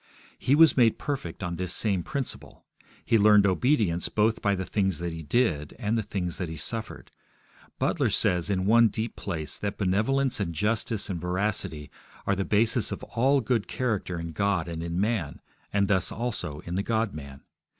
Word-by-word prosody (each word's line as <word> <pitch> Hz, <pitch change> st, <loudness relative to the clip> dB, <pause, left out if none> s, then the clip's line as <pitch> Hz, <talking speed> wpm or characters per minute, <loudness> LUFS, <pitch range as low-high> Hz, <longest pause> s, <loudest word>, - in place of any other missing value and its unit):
He 135 Hz, -, +3 dB
was 160 Hz, 0 st, +6 dB
made 120 Hz, -4 st, +4 dB
perfect 130 Hz, -, -4 dB
on 85 Hz, -1 st, -3 dB
this 90 Hz, -1 st, -2 dB
same 100 Hz, -4 st, +3 dB
principle. 140 Hz, -, -6 dB, 0.4 s
He 115 Hz, -, +3 dB
learned 105 Hz, -1 st, +6 dB
obedience 100 Hz, -, +1 dB
both 110 Hz, +1 st, +1 dB
by 100 Hz, -1 st, +2 dB
the 95 Hz, 0 st, -3 dB
things 95 Hz, -4 st, 0 dB
that 85 Hz, 0 st, -4 dB
He 80 Hz, -, -6 dB
did, 75 Hz, -, 0 dB
and 110 Hz, -2 st, -1 dB
the 115 Hz, -, +1 dB
things 90 Hz, -4 st, -3 dB
that 90 Hz, -3 st, -3 dB
He 80 Hz, -, -6 dB
suffered. 110 Hz, +8 st, -5 dB, 0.7 s
Butler -, -, +1 dB
says 90 Hz, +1 st, +2 dB
in 95 Hz, -2 st, 0 dB
one 115 Hz, +3 st, +6 dB
deep 110 Hz, +2 st, -4 dB
place, 80 Hz, -6 st, -4 dB
that 100 Hz, -1 st, -4 dB
benevolence 120 Hz, +7 st, +1 dB
and 85 Hz, -5 st, -2 dB
justice 105 Hz, +3 st, 0 dB
and 90 Hz, -5 st, -4 dB
veracity 90 Hz, -4 st, -2 dB, 0.3 s
are 100 Hz, -, +1 dB
the 95 Hz, -, -1 dB
basis 110 Hz, +2 st, +1 dB
of -, -, -5 dB
all 135 Hz, +4 st, +2 dB
good 115 Hz, -2 st, 0 dB
character 105 Hz, -8 st, -2 dB
in 85 Hz, 0 st, -5 dB
God 90 Hz, 0 st, 0 dB
and 85 Hz, -1 st, -5 dB
in 85 Hz, +1 st, -3 dB
man, 100 Hz, -8 st, -1 dB, 0.3 s
and 100 Hz, -1 st, +2 dB
thus 95 Hz, -2 st, +1 dB
also 95 Hz, -10 st, -4 dB
in 85 Hz, -, -7 dB
the 95 Hz, -, 0 dB
God 110 Hz, 0 st, -1 dB
man. 70 Hz, -3 st, -9 dB
100 Hz, 185 wpm, -27 LUFS, 85-115 Hz, 0.7 s, was